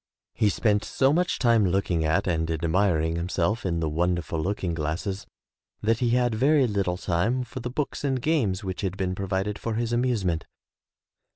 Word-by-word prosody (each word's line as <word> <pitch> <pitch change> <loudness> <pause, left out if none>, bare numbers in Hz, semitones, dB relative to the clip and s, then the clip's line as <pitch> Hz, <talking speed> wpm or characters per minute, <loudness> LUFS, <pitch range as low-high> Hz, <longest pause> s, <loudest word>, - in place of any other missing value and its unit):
He 110 -2 +2
spent 105 +1 +1
so 135 +1 +2
much 180 +2 +1
time 115 -3 +4
looking 90 -3 +1
at 80 +1 +1
and 80 -2 0
admiring 80 0 +1
himself 90 +4 -1
in 85 -2 -1
the 80 - 0
wonderful 85 +1 -1
looking 90 -1 -2
glasses 80 +5 -3 0.6
that 115 +1 +2
he 120 - +1
had 120 0 +2
very 135 +4 +3
Httle 95 -4 -1
time 105 +10 0
for 125 +2 -8
the 125 - -4
books 140 +3 -3
and 135 -2 0
games 120 -10 0
which 95 -1 -4
had 95 -1 -2
been 95 -2 -1
provided 95 +2 -2
for 115 -1 -3
his 115 +1 -1
amuse 120 -4 +1
ment. 85 -2 -1
100 Hz, 180 wpm, -26 LUFS, 85-120 Hz, 0.6 s, time